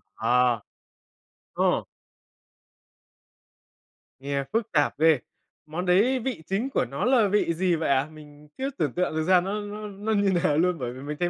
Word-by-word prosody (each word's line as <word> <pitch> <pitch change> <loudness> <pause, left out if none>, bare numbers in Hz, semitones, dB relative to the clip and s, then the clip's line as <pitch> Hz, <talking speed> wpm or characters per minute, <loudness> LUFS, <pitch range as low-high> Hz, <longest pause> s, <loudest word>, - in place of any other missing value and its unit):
Ờ. 125 -2 +2 0.9
Ồ. - - +1 2.4
Nghe 140 0 -2
phức 225 -1 -1
tạp 145 -2 +1
ghê. 160 -3 +5 0.5
Món 165 +4 -4
đấy 210 +9 +3
vị 245 -7 -4
chính 210 +8 -1
của - - 0
nó - - -3
là 245 -4 +4
vị 200 -4 +1
gì 180 +1 +1
vậy 160 -2 -2
ạ? 140 +2 +2
Mình 150 -1 -15
chưa 270 +1 -2
tưởng 150 -7 -1
tượng 180 -3 -1
được 160 - 0
ra 185 +1 +4
nó 200 +3 -3
nó 210 +1 -7
nó 205 +2 -4
như 200 -2 +2
nào 145 - +2
luôn 180 +1 +2
bởi 120 -2 -4
vì 130 - -10
mình 145 +2 -5
thấy 175 0 +1
175 Hz, 175 wpm, -26 LUFS, 150-205 Hz, 2.4 s, ghê